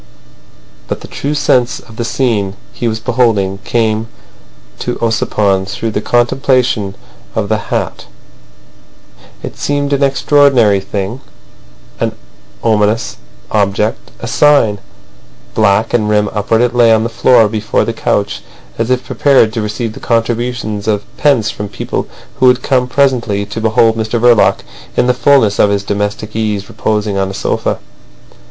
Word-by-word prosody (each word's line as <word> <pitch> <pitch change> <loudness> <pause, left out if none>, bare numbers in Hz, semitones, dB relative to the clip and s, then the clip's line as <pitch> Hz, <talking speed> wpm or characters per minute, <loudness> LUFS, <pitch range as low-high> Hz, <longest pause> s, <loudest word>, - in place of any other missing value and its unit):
But - - -4
the - - -9
true 145 +2 -3
sense 125 -4 +1
of 110 0 -15
the 120 - -2
scene 115 -5 -1 0.2
he 120 - -3
was 110 -1 -1
beholding 110 -5 +1
came 110 -1 0 0.7
to 125 - -3
Ossipon 100 -4 0
through 110 +3 -3
the 105 - -2
contemplation 120 -4 +1 0.4
of 105 -2 -1
the 110 -1 +1
hat. - - -3 1.4
It - - -7
seemed 145 0 -1
an 140 - 0
extraordinary 135 -6 +3
thing, 100 +5 -4 0.8
an - - -1 0.5
ominous 110 +1 +1 0.3
object, 105 +1 0
a - - -6
sign. 115 -4 +3 0.7
Black, 110 +1 +2
and 110 -3 +1
rim 105 -1 +1
upward, 110 +2 +1
it 120 0 +1
lay 120 -2 +5
on 110 0 +3
the - - 0
floor 115 0 +4
before 105 0 -1
the - - -2
couch - - -1 0.4
as 115 +1 0
if 130 0 0
prepared 135 -6 +3
to 115 - -2
receive 105 +1 -3
the - - -10
contributions 115 -2 -2
of 105 -2 0
pence 135 -8 +2
from 105 -1 -6
people - - -4 0.3
who 130 - +5
would 125 0 +3
come 125 -2 +1
presently 125 -7 +1
to 115 - -6
behold 110 0 +3
Mr 110 +1 -1
Verloc 120 -2 +4 0.4
in - - +3
the 125 - +3
fullness 125 -6 +3
of 105 - +5
his 100 -1 0
domestic 105 +1 -3
ease 105 -3 -2
reposing 105 -2 -1
on 95 0 0
a 95 - -6
sofa. - - -1
110 Hz, 150 wpm, -14 LUFS, 105-125 Hz, 1.4 s, lay